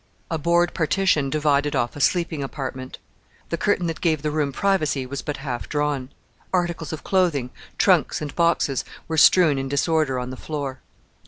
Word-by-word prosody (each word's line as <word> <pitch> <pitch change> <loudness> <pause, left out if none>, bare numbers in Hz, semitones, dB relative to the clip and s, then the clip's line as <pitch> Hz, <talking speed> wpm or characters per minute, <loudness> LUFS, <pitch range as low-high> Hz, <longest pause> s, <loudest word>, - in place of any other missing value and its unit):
A 165 - -1
board 170 +2 +2
partition 160 -4 +1
divided 145 0 +1
off 120 -2 0
a 145 - -5
sleeping 165 -2 +1
apartment. 130 -2 -5 0.5
The 170 - -1
curtain 205 -4 +1
that 165 -1 -3
gave 155 -4 +1
the 150 - 0
room 150 -2 0
privacy 155 -5 0
was 140 +2 -5
but 150 - -4
half 130 -4 -5
drawn. 145 -3 -1 0.4
Articles 175 -3 -1
of 155 - -6
clothing, 165 -10 +1 0.3
trunks, - - +3
and 150 -2 -6
boxes 170 -6 +1 0.2
were 160 - -2
strewn 155 -1 +6
in 135 0 -3
disorder 145 -1 +1
on 125 0 -4
the 130 - -7
floor. 140 -3 -5
150 Hz, 170 wpm, -23 LUFS, 135-170 Hz, 0.5 s, strewn